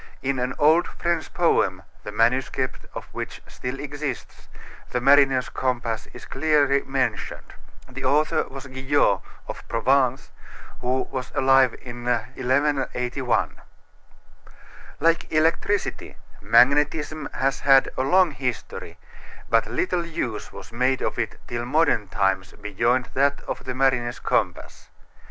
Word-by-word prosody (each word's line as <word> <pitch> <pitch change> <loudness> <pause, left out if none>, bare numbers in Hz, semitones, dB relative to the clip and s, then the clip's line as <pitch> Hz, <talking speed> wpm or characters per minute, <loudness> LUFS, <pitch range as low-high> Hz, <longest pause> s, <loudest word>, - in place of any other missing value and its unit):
In 135 -1 0
an 125 +1 -2
old 160 +4 +4
French 170 -2 -2
poem, 95 - +1 0.2
the 105 - -6
manuscript 130 +3 0
of - - -6
which - - -6
still 125 +2 -6
exists, 145 -2 -6 0.4
the 125 - -1
mariner's 135 0 +4
compass 120 -3 -2
is - - -11
clearly 140 -1 +2
mentioned. 130 -6 -3 0.3
The 130 +1 -8
author 150 +2 +2
was 135 0 -9
Guyot, 130 -6 +1 0.3
of - - -8
Provence, 130 +2 +1 0.5
who 130 +1 0
was 130 -1 -5
alive 135 -2 +4
in 120 -1 -8
1181. 125 0 0 1.4
Like 165 0 +1
electricity, 165 +6 0 0.2
magnetism 150 +3 +3
has 135 +1 0
had 135 -1 +5
a - - -1
long 180 +6 +4
history, 125 -3 -5 0.5
but 115 0 +3
little 180 -1 -1
use 120 -9 -4
was - - -11
made 130 +2 +1
of - - -2
it 110 -3 -2
till 120 0 -3
modern 130 -5 +2
times 95 0 0
beyond 115 +5 0
that 140 +1 +1
of - - -6
the 130 -1 -4
mariner's 130 -3 +1
compass. - - -2
130 Hz, 125 wpm, -24 LUFS, 120-145 Hz, 1.4 s, had